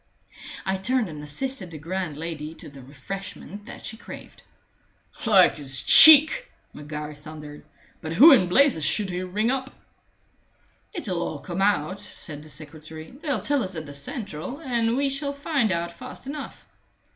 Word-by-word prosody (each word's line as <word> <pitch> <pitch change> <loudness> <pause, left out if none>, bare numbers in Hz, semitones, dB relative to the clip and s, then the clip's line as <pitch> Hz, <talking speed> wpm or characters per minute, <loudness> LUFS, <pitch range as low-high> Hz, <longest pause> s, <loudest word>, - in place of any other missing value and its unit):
I 190 0 0
turned 230 +2 -1
and 150 -2 -8
assisted 195 - -2
the 160 - -9
grand 165 0 -4
lady 160 -1 -6
to - - -11
the 140 -1 -13
refreshment 195 +9 -8
that 270 - -10
she 220 - -5
craved. - - -12 0.9
"Like 195 -6 +5
his 135 -3 -1
cheek!" 315 - +8 0.2
Maguire 150 0 -7
thundered. 150 0 -11 0.4
"But 160 0 -5
who 285 - +9
in 185 -10 +5
blazes 250 - +3
should 195 +6 +1
he 180 +1 -3
ring 205 +6 -1
up?" 265 0 -3 1.2
"It'll 190 - -4
all 155 - -3
come 175 +6 -5
out," 195 -2 +1
said 155 -7 -7
the 155 - -14
secretary. 155 +2 -10
"They'll 280 - -3
tell 285 +4 0
us 185 -1 -3
at 160 -1 -5
the 145 - -10
central, 175 - -5
and 240 -5 -1
we 280 0 +1
shall 280 +1 -2
find 280 - 0
out 170 0 -2
fast 255 +8 -10
enough." 285 +2 -8
185 Hz, 160 wpm, -24 LUFS, 155-255 Hz, 1.2 s, who